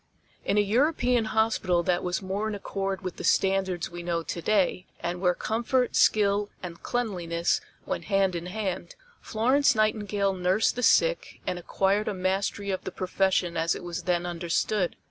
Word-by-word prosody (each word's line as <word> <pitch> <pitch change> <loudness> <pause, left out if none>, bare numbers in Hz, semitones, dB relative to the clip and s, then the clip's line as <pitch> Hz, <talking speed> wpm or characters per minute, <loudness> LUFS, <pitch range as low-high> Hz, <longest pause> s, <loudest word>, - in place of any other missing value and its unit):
In 200 - 0
a - - +6
European 245 +2 +2
hospital 215 -6 +1
that 175 0 +1
was 180 +3 -2
more 195 +3 -2
in 215 - -3
accord 195 -1 -3
with 185 -1 -5
the - - -6
standards 190 -3 +1
we 175 0 -6
know 170 -1 -2
to 170 - -5
day 190 -2 +1
and 175 +1 -3
where 180 -2 +3
comfort, 240 +3 0
skill 205 -1 +3
and 170 -2 -7
cleanliness 175 -8 -1 0.2
went - - -3
hand 195 -2 +2
in 170 +1 -4
hand, 185 -3 -4 0.3
Florence 260 +5 +2
Nightingale 205 -2 +1
nursed 185 +4 +1
the 245 - -3
sick - - +2
and 180 - -2
acquired 195 +4 0
a 210 - -1
mastery 195 +2 -1
of 190 - -3
the - - -5
profession 185 -2 0
as 165 +1 +1
it - - -8
was 175 -1 -4
then 175 -1 +1
understood. 175 +3 -1
195 Hz, 170 wpm, -27 LUFS, 180-215 Hz, 0.3 s, a